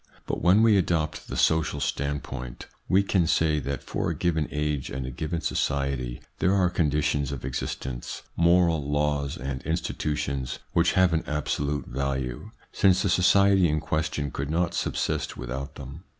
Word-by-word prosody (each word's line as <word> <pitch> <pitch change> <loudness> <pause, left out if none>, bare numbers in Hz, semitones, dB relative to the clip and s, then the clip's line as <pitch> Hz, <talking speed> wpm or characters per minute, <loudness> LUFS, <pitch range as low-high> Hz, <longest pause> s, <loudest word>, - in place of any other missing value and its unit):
But - - -3
when 95 +5 +5
we 110 -3 +6
adopt 80 -4 0
the - - -5
social 80 -2 +2
standpoint, 70 -3 -3 0.2
we 95 +2 +4
can 95 -4 +2
say 80 -2 +2
that 70 0 -4
for - - -2
a - - -2
given 80 -3 0
age 75 -2 -2
and 65 0 -4
a 65 - -5
given 80 +2 -3
society 70 -6 -1 0.2
there 95 +2 +3
are 90 -2 +3
conditions 75 -4 +1
of 65 -3 -5
existence, 65 -1 -4
moral 85 -4 +3
laws, 75 -1 0
and 65 +1 -4
institutions 75 -5 -2 0.2
which 85 0 +3
have 95 -3 +4
an 80 - +1
absolute 75 -1 -1
value, 65 -1 -3 0.2
since 95 -1 +3
the 100 - +1
society 95 0 +5
in 75 +1 +1
question 75 -2 -2
could 70 +1 -4
not 85 +2 0
subsist - - -2
without 65 +3 -5
them. 70 +5 -9
75 Hz, 160 wpm, -26 LUFS, 70-85 Hz, 0.2 s, we